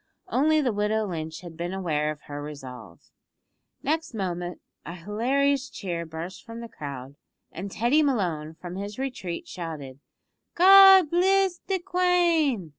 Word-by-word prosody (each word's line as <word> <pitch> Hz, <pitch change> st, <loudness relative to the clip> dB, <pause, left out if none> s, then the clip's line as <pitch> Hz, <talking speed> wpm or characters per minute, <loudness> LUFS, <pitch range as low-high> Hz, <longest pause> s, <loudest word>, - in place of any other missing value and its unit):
Only 310 Hz, +1 st, +3 dB
the 250 Hz, -5 st, 0 dB
widow 210 Hz, +1 st, 0 dB
Lynch 160 Hz, -4 st, -5 dB
had 170 Hz, -2 st, -10 dB
been 175 Hz, +3 st, -4 dB
aware 155 Hz, -5 st, -1 dB
of 155 Hz, -1 st, -6 dB
her 145 Hz, 0 st, -7 dB
resolve. 125 Hz, -, -10 dB, 0.7 s
Next 315 Hz, -3 st, -1 dB
moment 180 Hz, -3 st, -4 dB, 0.2 s
a 170 Hz, -, -7 dB
hilarious 265 Hz, +9 st, 0 dB
cheer 170 Hz, -4 st, -5 dB
burst 165 Hz, +4 st, -7 dB
from 230 Hz, 0 st, -9 dB
the 235 Hz, -, -7 dB
crowd, 140 Hz, -, -8 dB, 0.3 s
and 190 Hz, +4 st, -6 dB
Teddy 240 Hz, +10 st, +2 dB
Malone, 175 Hz, -, -1 dB
from 175 Hz, +2 st, -8 dB
his 200 Hz, +1 st, -6 dB
retreat, 250 Hz, -10 st, -5 dB
shouted, 150 Hz, -6 st, -7 dB, 0.6 s
"God 385 Hz, -2 st, +8 dB
bliss 380 Hz, +1 st, +2 dB
the 385 Hz, 0 st, +1 dB
Quane!" 345 Hz, -, +1 dB
200 Hz, 140 wpm, -26 LUFS, -, 0.7 s, God